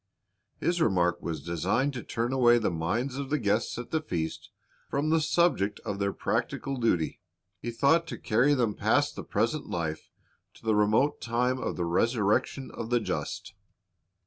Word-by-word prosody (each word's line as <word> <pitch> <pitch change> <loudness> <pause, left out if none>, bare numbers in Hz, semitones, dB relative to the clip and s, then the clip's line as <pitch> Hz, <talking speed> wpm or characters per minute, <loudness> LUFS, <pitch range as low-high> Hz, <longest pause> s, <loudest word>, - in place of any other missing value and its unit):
His 175 0 0
remark 90 - +2
was 80 -4 -4
designed 95 - 0
to 125 - -4
turn 120 +3 -2
away 120 -2 +5
the 110 - 0
minds 115 +11 -2
of 140 -1 -4
the 150 - +2
guests 110 -2 0
at 120 - -7
the 160 - +1
feast 85 - -4 0.4
from 150 +3 0
the 165 0 +4
subject 155 - +2
of 100 -3 -4
their 100 0 +1
practical 135 +6 -2
duty. 100 -10 0 0.4
He 120 - -4
thought 145 +8 +3
to - - -5
carry 125 +7 +3
them 120 -5 +1
past - - +1
the - - -6
present - - -1
life 80 -2 -3 0.5
to - - -18
the 110 - +3
remote 105 +7 +2
time 125 +2 0
of - - -3
the 90 - -1
resurrection 110 +7 +1
of 115 -1 -6
the 120 0 +3
just. 110 - -4
115 Hz, 170 wpm, -28 LUFS, 100-135 Hz, 0.5 s, away